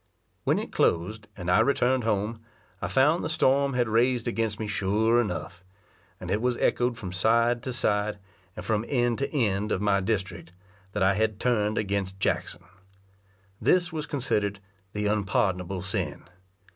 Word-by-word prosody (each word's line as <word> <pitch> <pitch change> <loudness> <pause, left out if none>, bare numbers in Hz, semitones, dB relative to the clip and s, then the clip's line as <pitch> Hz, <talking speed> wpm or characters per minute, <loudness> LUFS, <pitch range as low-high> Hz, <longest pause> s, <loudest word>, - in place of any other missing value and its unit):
When - - +3
it - - -4
closed, 105 +6 0
and 90 -2 -2
I 90 - +5
returned 130 -3 +2
home, 110 +1 -1 0.4
I - - -1
found 150 +6 +3
the - - -2
storm 140 -3 +2
had 120 -2 +2
raised 120 +2 +2
against 115 -3 -1
me 110 - -2
sure 105 +4 +2
enough; 90 -3 -5 0.6
and - - -6
it 105 - +1
was 125 0 0
echoed 120 -1 +1
from 95 -7 -6
side 115 +5 +2
to 130 - -4
side, 105 -3 0 0.4
and - - -7
from 110 -1 0
end 120 -3 +1
to 140 - -2
end 105 -7 0
of - - +1
my 100 -1 +2
district, 95 -4 -3 0.4
that 105 - 0
I 95 +1 +4
had 110 0 0
turned 110 -4 +1
against 100 -2 -2
Jackson. 90 -1 -1 1.0
This 175 -1 +2
was 155 -1 -4
considered 105 -8 -1 0.3
the 105 0 -2
unpardonable 95 -3 0
sin. - - -3
110 Hz, 160 wpm, -27 LUFS, 100-120 Hz, 1.0 s, I